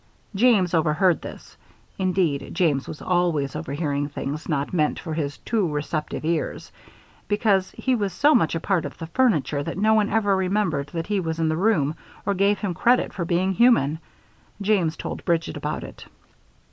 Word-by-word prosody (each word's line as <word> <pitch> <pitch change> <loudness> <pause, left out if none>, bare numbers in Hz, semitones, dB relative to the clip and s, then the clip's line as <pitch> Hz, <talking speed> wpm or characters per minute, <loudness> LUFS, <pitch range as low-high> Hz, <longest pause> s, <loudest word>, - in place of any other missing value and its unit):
James 200 -4 +3
overheard 165 +2 +2
this. - - -10 0.4
Indeed, 175 -8 0
James 155 -7 +1
was 150 - -8
always 170 -7 0
overhearing 145 -2 -2
things 145 +2 -5
not 145 0 -1
meant 155 -4 +1
for 160 - -5
his 145 -3 -3
too 215 -5 0
receptive 150 +1 -3
ears, 165 -1 -2 0.6
because 205 -3 +2
he 260 - 0
was 205 -5 0
so 285 - +4
much 165 - +2
a - - -1
part 180 0 0
of - - -7
the 165 - -6
furniture 165 - +1
that 165 +4 -5
no 215 +2 +3
one 215 -2 +3
ever 205 -3 +2
remembered 185 -6 0
that 165 +2 -4
he 205 -1 0
was 165 -3 -3
in 160 -1 +1
the 155 - 0
room 165 -6 +2 0.3
or 200 - +1
gave 200 +2 +2
him 200 -4 -3
credit 245 +8 +2
for 170 - -3
being 180 +3 +1
human. 175 - +3 0.6
James 190 -6 +1
told - - -6
Bridget 170 -2 0
about - - -4
it. - - -11
175 Hz, 175 wpm, -24 LUFS, 155-200 Hz, 0.6 s, so